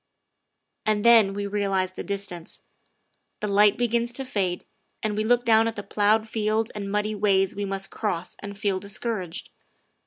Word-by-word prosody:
And 215 0 0
then 225 -4 +7
we 205 0 -2
realize 195 -2 0
the - - -7
distance. 195 -4 -6 0.8
The 210 - -2
light 205 0 +4
begins 235 0 0
to 270 +2 -3
fade, 190 -8 -2 0.4
and 215 -1 -1
we 215 - 0
look 245 +2 +2
down 225 0 +5
at 230 - -3
the 205 - -5
ploughed 215 +2 +2
fields 220 0 0
and 200 -1 -5
muddy 210 +1 0
ways 195 -2 +2
we 205 0 -2
must 195 0 -3
cross 185 -5 -3
and 200 0 -8
feel 200 -3 0
discouraged. 200 -3 -5
205 Hz, 165 wpm, -25 LUFS, 195-220 Hz, 0.8 s, then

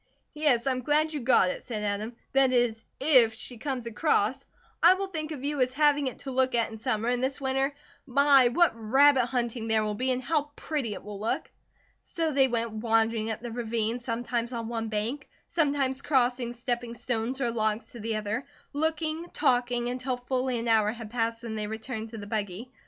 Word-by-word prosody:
"Yes. 290 -6 +2
I'm 260 -2 0
glad 305 +4 +2
you 295 - -2
got 240 -7 +4
it," - - -6
said 215 -4 -5
Adam, 210 +3 -2 0.2
"that 270 -1 +4
is, 240 -3 +1 0.2
if 255 -6 +5
she 240 +1 -7
come 265 -1 -3
across. 245 +1 +1 0.4
I 355 +2 +8
will 390 +1 -2
think 320 -5 -5
of 280 -4 -6
you 290 -1 -1
as 255 0 +2
having 290 0 +3
it 255 - -4
to 270 - -6
look 260 -1 +2
at 230 -1 +1
in 220 - -8
summer; 225 -2 -1
and 245 0 0
this 265 0 -1
winter 270 +1 0 0.4
my, 275 -1 +5
what 340 +8 +4
rabbit 255 +3 +4
hunting 240 -2 -2
there 220 -1 +2
will 210 0 -1
be, 255 +5 -1
and 255 0 -1
how 300 +1 0
pretty 270 -9 -2
it - - -9
will 205 -1 -8
look!" 220 +2 -2 0.5
So 330 -3 -2
they 270 -2 +4
went 235 -2 -1
wandering 225 0 +1
up 220 - -3
the 240 -1 -6
ravine, 230 0 -2
sometimes 235 0 -3
on 230 -1 -4
one 225 -1 -3
bank, 225 +6 -3 0.2
sometimes 280 -5 0
crossing 245 -4 +1
stepping 240 -1 -3
stones 240 +2 -2
or 240 -3 0
logs 220 0 -1
to 240 - -10
the 225 +1 -2
other, 215 +5 -3 0.3
looking, 315 +2 -1
talking, 245 -3 +1
until 255 +1 -2
a - - -11
full 255 +1 -2 0.2
hour 220 -2 +4
had 225 -2 -9
passed 230 -1 -1
when 230 -2 -5
they 215 -1 -3
returned 220 +1 -5
to 225 - -8
the 205 - -7
buggy. 210 +3 -4
245 Hz, 200 wpm, -28 LUFS, 225-270 Hz, 0.5 s, I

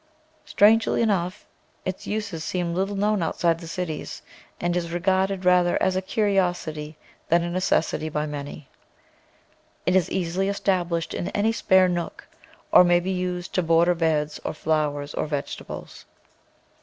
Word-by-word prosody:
Strangely 220 +3 +4
enough, 190 -3 -1 0.4
its 185 0 -4
use 210 0 -2
seems 175 -1 -2
little 195 +2 -1
known 205 0 +1
out 165 - -2
side 165 -1 +2
the 165 - -9
cities, 165 -2 -5 0.4
and 175 0 -1
is 170 -1 -1
regarded 190 +2 0
rather 180 -1 +4
as 185 - +1
a 185 - +1
curiosity 180 -7 -1 0.3
than 170 +1 +4
a 175 - -3
necessit}? 175 -3 0
by 150 0 -1
many. 145 -1 -7 1.2
It 180 - +2
is 185 -3 +3
easily 185 +2 -1
established 175 -4 -1
in 175 - -3
any 215 +2 +2
spare 190 -4 +4
nook, 175 -1 -4 0.4
or - - +8
may 175 -1 +4
be 185 +2 -3
used 180 -1 -3
to 185 - +2
border 165 +1 +4
beds 155 -3 0
of - - -5
flowers 150 -2 -1
or - - -2
vegetables. 145 -2 -6
175 Hz, 150 wpm, -24 LUFS, 165-190 Hz, 1.2 s, or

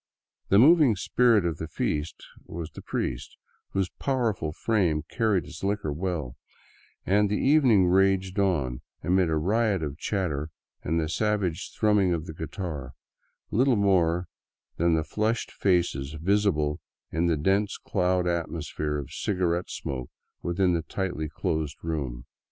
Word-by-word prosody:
The 100 - +5
moving 145 -1 +6
spirit 115 0 +3
of 85 -3 -1
the 80 - -5
feast 75 0 -3 0.2
was 85 -1 -6
the - - -10
priest, - - -4 0.4
whose 95 -2 0
powerful 115 - 0
frame 85 -4 +1
carried 110 - 0
his 80 - -10
liquor 100 -6 -1
well, 80 -6 -3 0.7
and 105 +2 +3
the 105 - 0
evening 130 -10 +4
raged 95 +1 +2
on 75 -11 0 0.2
amid 90 -1 +2
a 80 - +1
riot 100 +3 +1
of 75 +1 -5
chatter 80 -8 -2 0.3
and 80 +2 0
the 80 - -1
savage 95 +1 -1
thrumming 105 -5 +3
of 80 -1 -5
the 80 - -7
guitar, 80 -2 -5 0.6
little 130 +3 +3
more 90 -4 +2 0.5
than 85 0 +3
the 80 - +1
flushed 110 +7 -1
faces 85 -7 0
visible 80 -3 +1 0.3
in 85 +1 +1
the 80 -2 +2
dense 95 +7 +1
clouded 90 -1 0
atmosphere 80 -3 -3
of 70 0 -6
cigarette 90 -2 -1
smoke 65 -2 -5 0.3
within 90 +1 +1
the 85 - +1
tightly 85 -3 -3
closed 75 -2 -2
room. 70 -7 -3
90 Hz, 140 wpm, -27 LUFS, 80-100 Hz, 0.7 s, moving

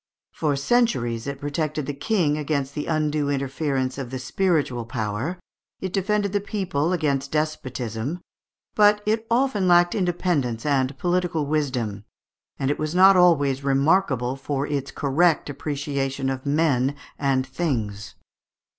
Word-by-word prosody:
For 150 -3 0
centuries 140 - +1
it 140 -1 -4
protected 150 +1 -2
the 145 - -3
King 150 0 +1
against 140 -2 -2
the 150 - -4
undue 150 -2 0
interference 135 -1 -1
of 130 -3 -5
the 130 - -4
spiritual 145 -4 0
power, 115 - -3 0.4
it 190 -1 -4
defended 205 0 0
the 205 - +2
people 180 -7 -1
against 140 -5 0
despotism, 135 -2 -2 0.5
but 210 0 +4
it 220 +1 0
often 235 -5 +2
lacked 175 0 +5
independence 175 - -1
and 135 -2 +1
political 175 -2 0
wisdom, 130 -9 -1 0.5
and 135 +1 0
it - - -3
was 155 +2 -2
not 190 +1 +7
always 145 -7 +4
remarkable 135 -2 +2
for 140 0 -2
its 140 -2 -3
correct 150 +2 +1
appreciation 140 -2 -2
of 130 +1 -5
men 140 -3 +2 0.2
and 135 -2 +1
things. 125 -8 -3
145 Hz, 135 wpm, -24 LUFS, 135-175 Hz, 0.5 s, not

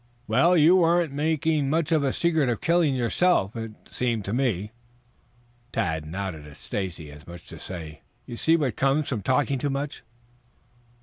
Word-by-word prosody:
"Well, 160 +11 +4
you 165 +4 +6
weren't 170 -3 +2
making 155 -1 0
much 160 +1 0
of 155 -3 +3
a 135 - +1
secret 160 -5 +1
of 115 - -1
the - - -11
killing 165 -4 +3
yourself, 125 - +1
it 115 -1 -5 0.2
seemed 115 -5 -1
to 100 - -3
me." 110 -6 0 1.0
Tad 80 -8 -2
nodded 85 -3 -5
at 70 - -13
Stacy 90 -6 -5
as 75 +2 -14
much 85 -1 -10
as - - -16
to - - -10
say, 80 -4 -8 0.2
"You 120 - -7
see 160 +7 +3
what 135 -8 -1
comes 135 +2 +1
from 115 -6 -2
talking 135 +3 +1
too 145 - -1
much." 140 +1 -4
130 Hz, 180 wpm, -25 LUFS, 100-155 Hz, 1.0 s, you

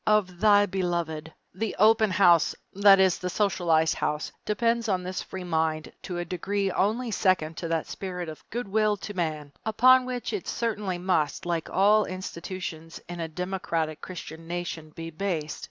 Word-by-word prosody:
Of 195 -5 +2
thy 205 0 +6
beloved_. 170 -5 -2 0.2
The 210 +3 -3
"open 220 +1 +5
house," 175 -4 +4 0.2
that 200 0 +7
is, 190 -2 +4
the 180 - -3
socialized 175 -5 +2
house, 150 0 -2
depends 230 +2 +1
upon 185 -3 0
this 185 +1 -3
free 190 -1 -7
mind 160 -2 -1
to 180 - -5
a 175 - -2
degree 195 +3 -1
only 225 +6 0
second 185 -6 +1
to 170 - -4
that 165 -1 -1
spirit 180 -3 -5
of 155 -1 -9
"good 240 -1 -4
will 210 +1 +2
to 205 +2 -7
man," 155 -5 -3
upon 255 +4 +5
which 250 - -3
it 410 - -4
certainly 210 -5 -2
must, 175 -2 0
like 170 -2 -2
all 210 +3 +4
institutions 180 -3 -6
in 175 0 -7
a 165 - -2
democratic 165 -2 -3
Christian 165 -2 -8
nation, 170 -2 -4
be 165 +1 -8
based. 160 -3 -3
185 Hz, 170 wpm, -27 LUFS, 165-205 Hz, 0.2 s, that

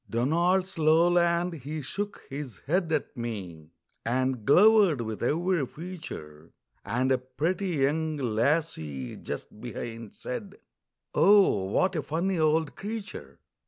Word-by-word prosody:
Donald's 170 +9 +1
lowland, 170 +2 +3
he 150 +3 -5
shook 205 +9 -5
his 135 -7 -6
head 170 +2 0
at 155 - -1
me, 95 - -6 0.3
And 125 -1 -1
glowered 195 - +6
with 110 -2 -5
every 170 +5 +1
feature, 120 - -9 0.3
And 130 +2 0
a 130 - +3
pretty 160 +10 -2 0.2
young 155 +2 -1
lassie 115 - -1
just 105 - -7
behind 115 -2 -7
Said: 195 +10 -6 0.6
"Oh, 195 - +5
what 185 - +1
a 155 - 0
funny 170 +6 -1
old 155 -1 +2
creature!" 215 +1 -7
155 Hz, 120 wpm, -28 LUFS, 120-175 Hz, 0.6 s, glowered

